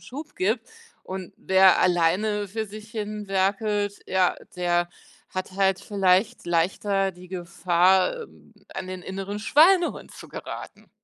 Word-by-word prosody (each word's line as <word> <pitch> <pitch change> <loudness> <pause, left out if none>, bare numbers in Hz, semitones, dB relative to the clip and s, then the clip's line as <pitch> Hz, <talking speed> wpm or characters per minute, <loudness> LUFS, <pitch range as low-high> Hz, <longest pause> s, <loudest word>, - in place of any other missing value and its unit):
Schub 295 +4 -9
gibt. 220 +5 0 0.4
Und 185 -1 -7
wer 190 0 +5
alleine 185 +4 +2
für 220 +3 -4
sich 215 +1 -11
hin 210 -1 -4
werkelt, 205 +1 0
ja, 185 -1 +2 0.2
der 175 -1 +1 0.4
hat 185 0 -5
halt 190 -1 +2
vielleicht 195 -1 +1
leichter 195 +3 +1
die 180 0 -14
Gefahr, 185 - +2
ähm, - - -17 0.2
an 190 -1 -5
den 185 -1 -6
inneren 195 +2 -5
Schweinehund 340 - +3
zu - - -12
geraten. - - -9
195 Hz, 130 wpm, -25 LUFS, 185-210 Hz, 0.4 s, wer